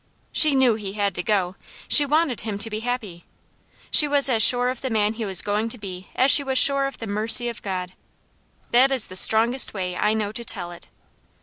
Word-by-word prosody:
She 305 Hz, -3 st, +3 dB
knew 260 Hz, -3 st, +2 dB
he 205 Hz, -3 st, -8 dB
had 200 Hz, -2 st, -3 dB
to 180 Hz, -, -5 dB
go. 190 Hz, -2 st, -3 dB, 0.3 s
She 290 Hz, -2 st, +5 dB
wanted 300 Hz, -4 st, -2 dB
him 215 Hz, -2 st, -7 dB
to 225 Hz, +2 st, -3 dB
be 215 Hz, -, -5 dB
happy. 225 Hz, -7 st, -7 dB, 0.7 s
She 300 Hz, -, +7 dB
was 285 Hz, -1 st, +3 dB
as 230 Hz, -3 st, -1 dB
sure 245 Hz, +2 st, +5 dB
of 255 Hz, -1 st, -7 dB
the 260 Hz, -, -5 dB
man 215 Hz, -2 st, -2 dB
he 225 Hz, 0 st, -7 dB
was 190 Hz, -3 st, +2 dB
going 210 Hz, +2 st, -4 dB
to 245 Hz, -, -8 dB
be 190 Hz, -3 st, -11 dB
as 265 Hz, +2 st, +2 dB
she 285 Hz, -, +5 dB
was 265 Hz, -1 st, -4 dB
sure 275 Hz, 0 st, +2 dB
of 275 Hz, -, -10 dB
the 225 Hz, -, -9 dB
mercy 220 Hz, +4 st, +3 dB
of 235 Hz, -, -11 dB
God. 185 Hz, -2 st, -7 dB, 0.8 s
That 255 Hz, +3 st, +2 dB
is 260 Hz, -4 st, +3 dB
the 185 Hz, -, -12 dB
strongest 230 Hz, +5 st, +3 dB
way 180 Hz, -2 st, -6 dB
I 210 Hz, +4 st, -2 dB
know 210 Hz, -2 st, -4 dB
to 235 Hz, +2 st, -8 dB
tell 175 Hz, -6 st, -5 dB
it. 175 Hz, -, -14 dB
220 Hz, 225 wpm, -20 LUFS, 200-255 Hz, 0.8 s, She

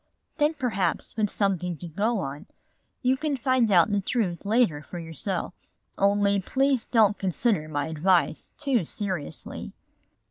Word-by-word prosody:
Then 300 Hz, +2 st, +3 dB
perhaps 215 Hz, -, -1 dB
with 210 Hz, -2 st, +1 dB
something 180 Hz, -5 st, -1 dB
to 175 Hz, -, -7 dB
go 210 Hz, +8 st, 0 dB
on, 140 Hz, 0 st, -6 dB, 0.6 s
you 255 Hz, +1 st, +3 dB
can 290 Hz, 0 st, -2 dB
find 250 Hz, -3 st, +2 dB
out 180 Hz, +1 st, +5 dB
the 205 Hz, -1 st, +1 dB
truth 195 Hz, -4 st, -1 dB
later 215 Hz, -9 st, +2 dB
for 175 Hz, -, -9 dB
yourself. 170 Hz, +3 st, -4 dB, 0.4 s
Only 200 Hz, 0 st, +3 dB
please 265 Hz, +4 st, +1 dB
don't 215 Hz, -4 st, +3 dB
consider 190 Hz, -2 st, 0 dB
my 145 Hz, -2 st, -1 dB
advice 170 Hz, +1 st, +1 dB
too 265 Hz, -8 st, +1 dB
seriously." 175 Hz, -, -5 dB
200 Hz, 140 wpm, -26 LUFS, 175-240 Hz, 0.6 s, out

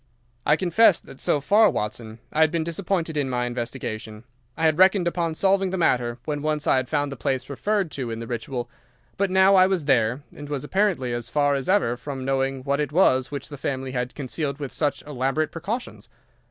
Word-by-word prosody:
"I 150 Hz, -, +6 dB
confess 185 Hz, +3 st, +4 dB
that 135 Hz, -, -14 dB
so 145 Hz, -, +1 dB
far, 205 Hz, +8 st, +5 dB
Watson, 110 Hz, +1 st, -4 dB, 0.2 s
I 155 Hz, -, +2 dB
had 160 Hz, -, +6 dB
been 165 Hz, 0 st, -1 dB
disappointed 170 Hz, -1 st, -2 dB
in 140 Hz, -2 st, 0 dB
my 125 Hz, -1 st, -1 dB
investigation. 115 Hz, -3 st, -5 dB, 0.3 s
I 160 Hz, -, -3 dB
had 160 Hz, +1 st, +3 dB
reckoned 190 Hz, -1 st, +5 dB
upon 170 Hz, -2 st, -1 dB
solving 195 Hz, +1 st, +2 dB
the 190 Hz, -, -2 dB
matter 120 Hz, -8 st, +1 dB
when 145 Hz, -1 st, -2 dB
once 155 Hz, 0 st, -1 dB
I -, -, +4 dB
had 130 Hz, -1 st, -1 dB
found 145 Hz, -1 st, 0 dB
the -, -, -5 dB
place 130 Hz, +1 st, -2 dB
referred 200 Hz, +4 st, -1 dB
to 130 Hz, -4 st, -4 dB
in 115 Hz, -, -4 dB
the 115 Hz, -, -6 dB
Ritual; 120 Hz, +1 st, -4 dB, 0.5 s
but 200 Hz, 0 st, 0 dB
now 190 Hz, +1 st, +5 dB
I 185 Hz, -1 st, +6 dB
was 185 Hz, -6 st, -1 dB
there, 125 Hz, 0 st, +2 dB
and 145 Hz, 0 st, -9 dB
was 145 Hz, -2 st, -3 dB
apparently 175 Hz, -8 st, 0 dB
as 120 Hz, -1 st, -4 dB
far 145 Hz, +2 st, +2 dB
as 135 Hz, +2 st, -2 dB
ever 185 Hz, -12 st, +3 dB
from 130 Hz, 0 st, -6 dB
knowing 135 Hz, 0 st, -1 dB
what 140 Hz, +1 st, 0 dB
it 150 Hz, -2 st, -1 dB
was 130 Hz, -7 st, +3 dB
which 140 Hz, -2 st, -6 dB
the 145 Hz, -2 st, -9 dB
family 130 Hz, -1 st, -3 dB
had 125 Hz, -1 st, -3 dB
concealed 140 Hz, 0 st, -3 dB
with 140 Hz, -3 st, -6 dB
such 145 Hz, -3 st, -1 dB
elaborate 145 Hz, +2 st, -1 dB
precautions. 205 Hz, +10 st, -5 dB
145 Hz, 210 wpm, -24 LUFS, 130-170 Hz, 0.5 s, I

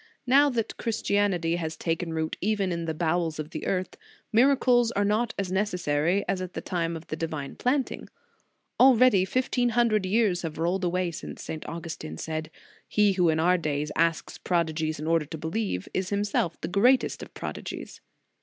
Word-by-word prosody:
Now 280 Hz, +3 st, +5 dB
that 235 Hz, -4 st, -2 dB
Christianity 200 Hz, -7 st, 0 dB
has 160 Hz, -2 st, -4 dB
taken 165 Hz, 0 st, -2 dB
root 160 Hz, -1 st, -2 dB
even 200 Hz, -2 st, 0 dB
in 170 Hz, -1 st, -2 dB
the 160 Hz, -, -2 dB
bowels 165 Hz, 0 st, 0 dB
of 155 Hz, +1 st, -5 dB
the -, -, -5 dB
earth, 185 Hz, -1 st, -2 dB, 0.4 s
miracles 245 Hz, -1 st, +4 dB
are 205 Hz, +1 st, +1 dB
not 220 Hz, +3 st, 0 dB
as 195 Hz, -2 st, -2 dB
necessary 180 Hz, -2 st, 0 dB
as 185 Hz, -, -1 dB
at 185 Hz, -1 st, -6 dB
the -, -, -4 dB
time 170 Hz, -2 st, -2 dB
of 165 Hz, -, -12 dB
the -, -, -4 dB
divine 155 Hz, -3 st, -4 dB
planting. 260 Hz, +1 st, -1 dB, 0.7 s
Already 250 Hz, -6 st, +6 dB
fifteen 245 Hz, +2 st, +1 dB
hun 240 Hz, 0 st, +3 dB
dred 210 Hz, -3 st, +1 dB
years 200 Hz, -3 st, +2 dB
have 160 Hz, -2 st, -5 dB
rolled 175 Hz, +4 st, 0 dB
away 180 Hz, 0 st, 0 dB
since 160 Hz, -, -8 dB
St. 155 Hz, -, -5 dB
Augustin 165 Hz, -, -6 dB
said: 155 Hz, -, -4 dB, 0.4 s
"He 210 Hz, -1 st, +3 dB
who 180 Hz, -3 st, +2 dB
in 160 Hz, 0 st, +1 dB
our 180 Hz, +2 st, +3 dB
days 150 Hz, -1 st, -2 dB
asks 165 Hz, 0 st, 0 dB
prodigies 160 Hz, -3 st, -1 dB
in 155 Hz, -, -5 dB
order 165 Hz, -2 st, +1 dB
to 160 Hz, -, -6 dB
believe, 160 Hz, -, -3 dB
is 185 Hz, 0 st, -1 dB
himself 200 Hz, -4 st, 0 dB
the -, -, -2 dB
greatest 240 Hz, +8 st, +3 dB
of -, -, -10 dB
prodigies. -, -, -7 dB
180 Hz, 180 wpm, -27 LUFS, 160-210 Hz, 0.7 s, Already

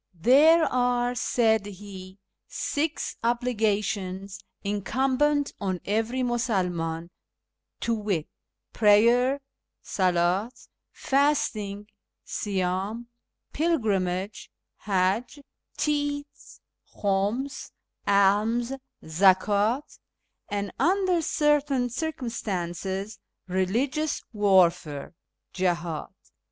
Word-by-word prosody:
" -, -, -51 dB
There 295 Hz, -, +6 dB
are," 245 Hz, -1 st, +1 dB
said 220 Hz, -4 st, +1 dB
he, 190 Hz, -1 st, -10 dB, 0.2 s
" -, -, -59 dB
six 305 Hz, +2 st, -2 dB
obligations 205 Hz, -5 st, -1 dB, 0.2 s
incumbent 265 Hz, +8 st, +1 dB
on 190 Hz, -2 st, -1 dB
every 225 Hz, +5 st, 0 dB
]\Iusulman, 180 Hz, -9 st, -1 dB, 0.7 s
to 235 Hz, -, 0 dB
wit, 205 Hz, -8 st, -1 dB, 0.5 s
Prayer 235 Hz, +5 st, +4 dB, 0.4 s
{soldi), 180 Hz, +3 st, +1 dB, 0.4 s
Fasting 270 Hz, -8 st, 0 dB, 0.4 s
(siydni), 195 Hz, +3 st, -2 dB, 0.5 s
Pilgrimage 205 Hz, -, -1 dB, 0.4 s
Qiajj), 205 Hz, +9 st, 0 dB, 0.3 s
Tithes 290 Hz, -1 st, -3 dB, 0.3 s
(khiims), 205 Hz, +7 st, -1 dB, 0.4 s
Alms 210 Hz, +5 st, +3 dB, 0.3 s
{zakdt), 200 Hz, -, +2 dB, 0.5 s
and, 200 Hz, 0 st, -2 dB
under 370 Hz, -1 st, +2 dB
certain 295 Hz, -5 st, +1 dB
cir 320 Hz, +6 st, -2 dB
cumstances, 195 Hz, -, -4 dB, 0.3 s
Eeligious 240 Hz, +12 st, 0 dB
Warfare 180 Hz, -8 st, +2 dB, 0.4 s
(jihdd). 170 Hz, -4 st, -1 dB
210 Hz, 70 wpm, -26 LUFS, 190-255 Hz, 0.7 s, There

